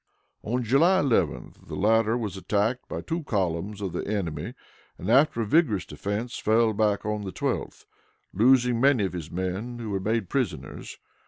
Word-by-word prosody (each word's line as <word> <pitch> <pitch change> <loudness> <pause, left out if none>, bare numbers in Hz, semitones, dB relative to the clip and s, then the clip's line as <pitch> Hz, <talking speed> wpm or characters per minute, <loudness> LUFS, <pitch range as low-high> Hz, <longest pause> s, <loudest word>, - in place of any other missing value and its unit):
On 125 +3 -2
July 165 - +4
11th 115 - -1
the - - -6
latter 115 +2 +3
was 105 -5 -4
attacked 105 +5 -1
by - - -4
two 165 +1 -3
columns 100 - -2
of 95 -4 -3
the - - -4
enemy, 100 -6 -3 0.4
and, - - -3
after 130 -2 +4
a - - 0
vigorous 105 - +2
defense, 105 +10 -4
fell 110 +1 +3
back 105 -1 +1
on 105 0 -1
the 95 -2 -5
12th, - - -3 0.5
losing 120 +2 +4
many 135 -6 +4
of 95 - -4
his 85 -3 -6
men, 95 +8 -3
who 115 -3 -5
were 95 - -1
made 110 +1 -1
prisoners. 85 - -3
110 Hz, 170 wpm, -26 LUFS, 95-120 Hz, 0.5 s, July